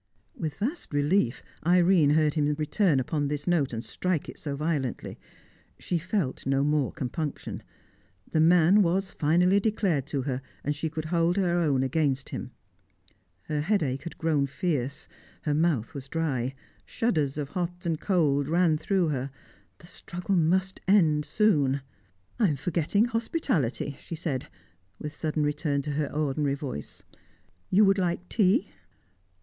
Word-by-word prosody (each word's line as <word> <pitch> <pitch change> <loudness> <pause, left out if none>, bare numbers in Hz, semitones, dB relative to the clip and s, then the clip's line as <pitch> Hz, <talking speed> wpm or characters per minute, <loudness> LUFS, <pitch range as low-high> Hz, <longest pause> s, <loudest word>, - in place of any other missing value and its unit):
With 155 -3 -4
vast 255 - -3
relief 145 -2 +1 0.2
Irene 175 -2 +4
heard 150 0 +3
him 150 -2 +1
return 155 0 +2
upon 145 +3 -1
this 145 0 -3
note, 170 -6 +1
and 115 0 -5
strike 180 -5 -2
it - - -9
so 145 -2 -4
violently. 145 -4 -2 0.6
She 175 - -2
felt 185 -5 -2
no 135 0 +2
more 145 -2 +1
compunction. 150 0 -4 0.7
The 155 - +2
man 175 +4 +6
was 190 +1 +1
finally 180 +6 +3
declared 195 - 0
to 140 -3 -2
her, 130 -1 -2 0.2
and 145 +1 -1
she 160 +2 -2
could 155 0 -5
hold 170 +2 +2
her 175 -3 +2
own 140 -6 +2
against 135 -1 0
him. 130 - -5 0.9
Her 150 +8 -2
headache 150 -7 0
had 170 +3 -8
grown 155 -4 +1
fierce; 140 -3 -2 0.4
her 150 - 0
mouth 150 -7 +1
was 135 -2 -8
dry; 135 -5 -1 0.3
shudders 155 - -1
of 145 -2 -3
hot 175 +2 -4
and 165 -2 -1
cold 145 -7 +2
ran 165 -1 +3
through 185 -1 +1
her. 135 -2 -2 0.5
The 170 - -16
struggle 180 +2 -4
must 185 +3 +1
end 160 -7 +4
soon. 145 -11 +2 0.6
"I 220 - +5
am 150 - +1
forgetting 170 - +1
hospitality," 225 - -1
she 165 - -7
said, 155 -6 -3 0.5
with 150 +6 -6
sudden 155 0 -1
return 145 -1 0
to 150 - -3
her 145 0 -1
ordinary 145 -1 0
voice. 135 - -7 0.7
"You 205 +3 +5
would 195 0 +3
like 180 0 -1
tea." 195 -4 +2
155 Hz, 150 wpm, -27 LUFS, 140-180 Hz, 0.9 s, man